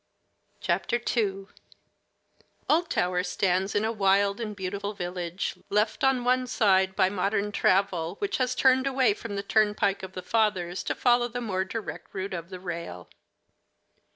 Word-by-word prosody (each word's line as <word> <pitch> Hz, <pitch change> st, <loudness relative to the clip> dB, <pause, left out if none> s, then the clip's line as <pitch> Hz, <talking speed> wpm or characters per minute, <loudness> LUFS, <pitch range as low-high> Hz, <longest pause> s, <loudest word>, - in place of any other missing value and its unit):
II 215 Hz, -5 st, 0 dB, 1.2 s
Oldtower 185 Hz, -, +1 dB
stands 190 Hz, +1 st, 0 dB
in 205 Hz, +1 st, +2 dB
a 220 Hz, -, 0 dB
wild 200 Hz, -1 st, +2 dB
and 210 Hz, -2 st, -4 dB
beautiful 200 Hz, +2 st, -4 dB
village, 180 Hz, -1 st, -4 dB
left 210 Hz, +2 st, 0 dB
on 265 Hz, -2 st, +3 dB
one 255 Hz, +1 st, +2 dB
side 190 Hz, -5 st, +2 dB
by 185 Hz, -, +4 dB
modern 200 Hz, +2 st, -1 dB
travel, 185 Hz, -4 st, +1 dB
which 405 Hz, -, -1 dB
has 255 Hz, -1 st, 0 dB
turned 260 Hz, 0 st, +4 dB
away 265 Hz, -5 st, +3 dB
from 205 Hz, 0 st, -7 dB
the 200 Hz, -, -3 dB
turnpike 210 Hz, -1 st, +2 dB
of 190 Hz, -1 st, -8 dB
the 185 Hz, -, -6 dB
fathers 190 Hz, -4 st, 0 dB
to -, -, -2 dB
follow 240 Hz, -1 st, +3 dB
the 245 Hz, +1 st, -5 dB
more 195 Hz, -6 st, -1 dB
direct 220 Hz, +1 st, -7 dB
route 190 Hz, 0 st, -3 dB
of 170 Hz, 0 st, -5 dB
the 185 Hz, -1 st, -8 dB
rail. 170 Hz, -, -6 dB
200 Hz, 150 wpm, -27 LUFS, 185-230 Hz, 1.2 s, by